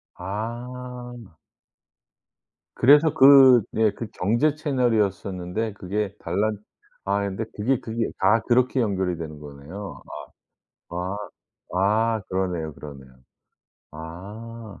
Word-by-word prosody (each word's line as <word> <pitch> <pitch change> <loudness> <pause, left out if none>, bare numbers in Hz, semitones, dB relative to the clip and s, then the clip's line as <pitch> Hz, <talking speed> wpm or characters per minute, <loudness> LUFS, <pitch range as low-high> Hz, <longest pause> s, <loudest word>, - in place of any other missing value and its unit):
아. 120 +2 -7 1.4
그래서 150 +4 +6
그 135 -4 +8
네 110 -1 +2
그 115 +3 -7
경제 120 +11 +2
채널이었었는데 110 - -1
그게 100 +1 -3
달란 105 +5 -1 0.5
아이 100 +1 0
근데 100 +3 -3
그게, 120 +4 +1
그게 115 0 -2
다 105 +4 +4
그렇게 125 +2 +3
연결이 95 -5 -1
되는 80 -2 -7
거네요. 75 +8 -9 0.9
아. 85 - -8 0.8
아. - - -1 0.4
아. - - -8
그러네요, 90 -4 -2
그러네요. 70 -3 -11 0.8
아. 100 +8 -9
105 Hz, 210 characters per minute, -24 LUFS, 90-120 Hz, 1.4 s, 그